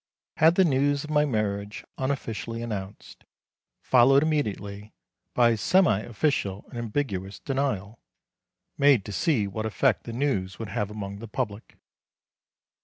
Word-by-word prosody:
Had 160 +2 +5
the 190 - +5
news 140 -1 +2
of 155 - -7
my 150 0 +3
marriage 105 -5 -2
unofficially 115 -4 -3
announced, 100 -4 -7 0.6
followed 135 +3 +5
immediately 105 -9 -2 0.4
by 120 -1 +5
a 115 - 0
semi 180 - +3
official 110 -4 -1
and 120 - -7
ambiguous 105 -5 -3
denial, 115 -6 -2 0.8
made 140 -7 +5
to 105 - -6
see 130 - +1
what 110 +3 -3
effect 120 +2 +1
the 115 - -5
news 115 -8 -1
would 110 -2 -6
have 100 +1 -2
among 100 -1 -6
the 115 - -8
public. 105 0 -5
115 Hz, 135 wpm, -26 LUFS, 100-140 Hz, 0.8 s, Had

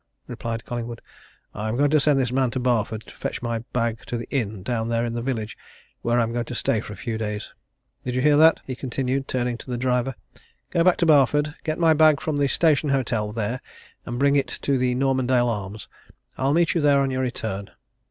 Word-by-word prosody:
replied 115 -2 -5
Collingwood. 120 -1 -5 0.5
"I'm 110 +3 -3
going 145 +1 +3
to 155 - +5
send 145 0 +3
this 125 -2 0
man 130 -1 +2
to 130 +2 -3
Barford 115 -3 0
to - - -13
fetch - - -4
my 115 -1 -1
bag 115 -2 0
to 120 - -2
the 115 - -6
inn 110 -7 -2
down 115 0 -2
there 115 0 +1
in 115 - -3
the 120 - -2
village, 115 -4 -3 0.5
where 120 +1 +1
I'm 115 0 0
going 120 0 -1
to 125 - -6
stay 115 - +1
for 105 - -9
a - - -7
few 110 +3 -4
days. 105 -1 -4 0.5
Did 125 -1 -3
you 130 - +1
hear 150 +1 +5
that?" 160 +1 +6
he 130 - -4
continued, 135 +1 -2
turning 120 -2 -1
to - - -10
the 125 - -2
driver. 125 +1 0 0.6
"Go 170 - +3
back 185 0 +4
to 170 - +2
Barford 145 -1 +4
get 155 -1 -2
my 165 -2 +5
bag 155 -1 +5
from 155 -2 -2
the 140 -1 +2
Station 150 0 +2
Hotel 115 -6 0
there 115 +3 -3 0.4
bring 140 +4 +1
it 140 - +2 0.2
to 140 -2 +1
the 125 -1 +1
Normandale 130 -2 +2
Arms 105 -2 -4 0.5
I'll 135 +3 +1
meet 170 0 +3
you 170 - +1
there 145 -1 +4
on 135 -1 +1
your 130 0 -1
return." 110 -6 -3
125 Hz, 220 wpm, -24 LUFS, 115-140 Hz, 0.6 s, that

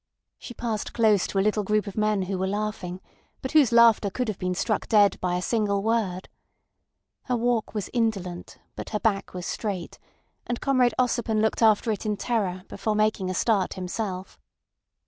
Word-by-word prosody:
She 240 - -9
passed 225 -3 -3
close 215 -4 +3
to - - -4
a 195 - +2
little 210 0 +1
group 210 +1 +1
of 200 - -7
men 215 -2 +1
who 185 0 -3
were 190 - 0
laughing, 195 -3 -3 0.4
but 260 - -3
whose 295 -7 +5
laughter 230 -3 +5
could 245 +4 -2
have 205 - -4
been 180 0 -1
struck 215 +3 -1
dead 205 -3 +4
by 180 -1 0
a 180 - -2
single 205 -3 0
word. 210 -5 -1 1.0
Her 250 -2 0
walk 235 -2 0
was 205 -3 -2
indolent, 200 -7 -2 0.2
but - - -7
her 210 - -2
back 200 -4 -1
was 180 -1 -5
straight, 195 -6 -4 0.5
and 240 -1 -2
Comrade 255 -3 +2
Ossipon 235 -3 +1
looked 220 +2 +1
after 220 +1 +4
it 210 - -3
in 210 -2 -1
terror 195 -7 -1
before 215 -1 -2
making 215 -3 +1
a 185 - -2
start 205 -4 +1
himself. 185 0 -5
210 Hz, 185 wpm, -25 LUFS, 190-225 Hz, 1.0 s, whose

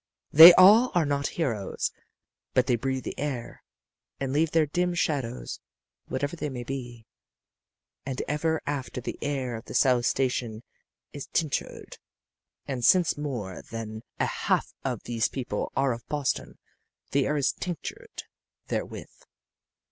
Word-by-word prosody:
They 160 +4 +12
all 215 +7 +7
are 170 -3 +3
not 140 0 0
heroes, 115 - -1 0.6
but 130 - +4
they 125 - +2
breathe 130 +2 -2
the - - -6
air 135 -4 -4 0.6
and 135 -1 -2
leave 155 +2 +2
their 160 0 +3
dim 175 +4 -1
shadows, 125 - -2 0.5
whatever 145 +5 -2
they 150 -3 -4
may 125 -3 -6
be, 120 -3 -7 1.0
and 130 -2 -5
ever 160 +2 -1
after 140 -3 -3
the 120 - -6
air 135 -4 -2
of 115 +2 -8
the - - -8
South 125 -3 +3
Station 125 -4 -1 0.5
is 145 - -7
tinctured. 155 -5 -3 0.7
And 130 -3 -4
since 180 +1 +4
more 125 -11 -5
than 110 -1 -6 0.2
a - - +2
half - - -1
of - - -3
these 115 -2 0
people 130 -2 -4
are 135 -2 +2
of 115 - -10
Boston, 145 -3 -2 0.5
the 140 -1 +2
air 150 - 0
is 140 - +2
tinctured 425 - -7 0.5
therewith. - - -4
135 Hz, 140 wpm, -27 LUFS, 120-150 Hz, 1.0 s, They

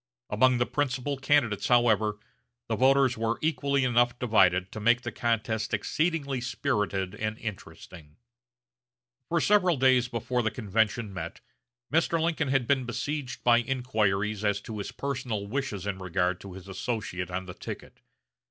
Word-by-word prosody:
Among 125 +4 +4
the 120 - +2
principal 140 0 -1
candidates, 130 -6 +2
however, 110 -4 +3 0.5
the 115 - 0
voters 130 -1 +3
were 115 +1 0
equally 140 -3 +1
enough 120 -1 +2
divided 95 -6 +3
to 110 - -6
make 120 +3 +3
the 120 - -4
contest 110 -1 -1
exceedingly 140 - -1
spirited 105 -7 -1
and 110 0 -3
interesting. 90 -7 -9 1.1
For 170 - +2
several 180 -3 +3
days 130 -1 +4
before 125 +1 -1
the 110 - +1
convention 110 -1 -1
met 95 - -6 0.5
Mr. 165 +1 +2
Lincoln 160 -2 0
had 135 -2 +1
been 135 +1 +2
besieged 140 +2 -4
by 120 -1 +5
inquiries 110 -5 0
as 105 -1 +1
to 110 -1 -7
his 100 - -5
personal 125 -7 -3
wishes 105 -4 -3
in 100 -2 -3
regard 90 -1 -1
to 100 -2 -9
his 95 0 -11
associate 95 -3 -3
on 95 +1 -4
the 90 - -8
ticket. - - -9
120 Hz, 150 wpm, -28 LUFS, 105-130 Hz, 1.1 s, by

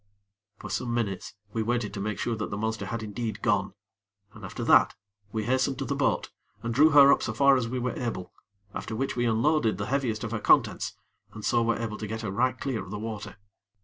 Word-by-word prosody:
For - - -8
some 120 -2 -1
minutes 105 -5 -3 0.2
we 115 - 0
waited 115 -1 -1
to - - -5
make 105 0 -2
sure 115 +2 -1
that 105 - -3
the 100 - -4
monster 110 +1 -2
had 115 -1 -4
indeed 110 +1 -4
gone, 100 -4 +1 0.6
and 110 -3 -13
after 95 - -5
that, - - +5 0.4
we 110 -1 -2
hastened 130 +3 +1
to 135 - -3
the 140 - -1
boat, 140 -1 0 0.3
and 115 0 -2
drew 150 +6 +6
her 140 -2 +8
up - - 0
so 110 - -2
far 140 +2 +6
as 125 -3 0
we 125 +2 -3
were 125 0 -1
able; 110 -7 -4 0.4
after 110 - -5
which 135 +4 -2
we 120 0 +1
unloaded 115 - +2
the 100 - -3
heaviest 120 -6 0
of 115 - -4
her 115 - -1
contents, - - +3 0.4
and 105 - -6
so 120 - +3
were 115 0 +1
able 110 -2 -4
to 110 - -4
get 110 +2 -4
her 105 -4 -3
right 125 +6 +1
clear 130 -5 -2
of 95 - -11
the 105 - -4
water. 105 -1 -6
115 Hz, 230 wpm, -27 LUFS, 105-125 Hz, 0.6 s, her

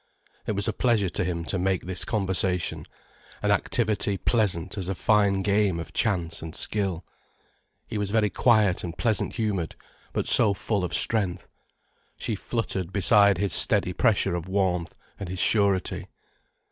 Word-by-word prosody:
It - - -1
was 100 0 -3
a - - -1
pleasure 110 -6 0
to 90 - -3
him 85 -2 -4
to 95 - -3
make 95 -1 -1
this 90 0 -3
conversation, 95 -4 -1 0.6
an - - +1
activity 105 -4 0
pleasant 105 -5 -1
as 95 -3 -5
a 95 - -2
fine 100 -1 +1
game 100 -3 +1
of 85 - -9
chance 90 -7 -1
and 80 +1 -8
skill. 95 -5 -3 0.8
He 105 - -5
was 100 -1 -3
very 105 -1 +1
quiet 110 -6 +2
and 85 -1 -7
pleasant 110 -5 -1
humoured, 105 -8 -3 0.4
but - - -3
so 100 -2 +6
full 100 0 -2
of 85 -4 -1
strength. 95 -3 +1 0.7
She 115 - -4
fluttered 100 -4 -3
beside 100 0 +4
his 100 0 0
steady 90 - +6
pressure 100 -3 +1
of 85 0 -4
warmth 90 -3 -1 0.3
and 100 - -6
his 95 - -5
surety. 100 -1 +1
95 Hz, 160 wpm, -25 LUFS, 90-105 Hz, 0.8 s, so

